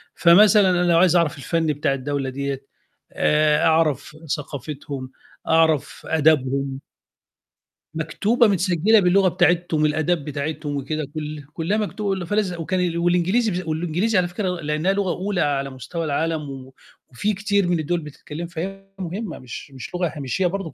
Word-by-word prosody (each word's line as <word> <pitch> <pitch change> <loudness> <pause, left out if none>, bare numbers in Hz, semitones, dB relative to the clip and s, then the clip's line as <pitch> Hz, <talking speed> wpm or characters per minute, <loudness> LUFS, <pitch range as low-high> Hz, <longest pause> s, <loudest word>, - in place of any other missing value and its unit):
فمثلًا 200 +3 +6
أنا 180 -1 +2
لو 165 - +5
عايز 180 0 +5
أعرف 170 -4 +2
الفن 165 +3 -1
بتاع 145 -2 0
الدولة 135 0 -2
ديّة 140 0 -4 0.5
آآ، 150 0 +2
أعرف 160 -3 +1 0.2
ثقافتهم، 140 -2 -7 0.4
أعرف 160 -3 +2
آدبهم. 140 -3 +1 1.1
مكتوبة، 210 +9 +2
متسجلة 190 +2 +3
باللغة 190 +1 +4
بتاعتهم، 175 -3 +2
الآداب 155 +1 0
بتاعتهم 150 0 -4
وكده، 155 +3 -3
كُلّ 150 -1 -5
كُلّها 170 +7 -1
مكتوبة، 200 -3 -2
فلاز 205 0 0
وكان 175 0 -1
والإنجليزي 180 +3 +1
والإنجليزي 175 +7 0
على 180 -1 +2
فكرة 185 +2 -3
لأنها 155 +5 0
لغة 195 -2 0
أولى 185 +2 -2
على 140 -1 0
مستوى 135 +6 -5
العالم 155 0 -1
و 135 -1 -9 0.4
وفي 205 +12 -1
كتير 200 -1 +1
من 175 -1 +1
الدوّل 170 +3 -1
بتتكلم، 150 +2 -8
فهي 195 +4 -6
مهمة 185 +1 -5
مش 130 +3 -9
مش 135 +5 -8
لغة 175 0 +1
هامشية 145 +6 -1
برضه، 185 -2 -4
165 Hz, 140 wpm, -22 LUFS, 150-185 Hz, 1.1 s, فمثلًا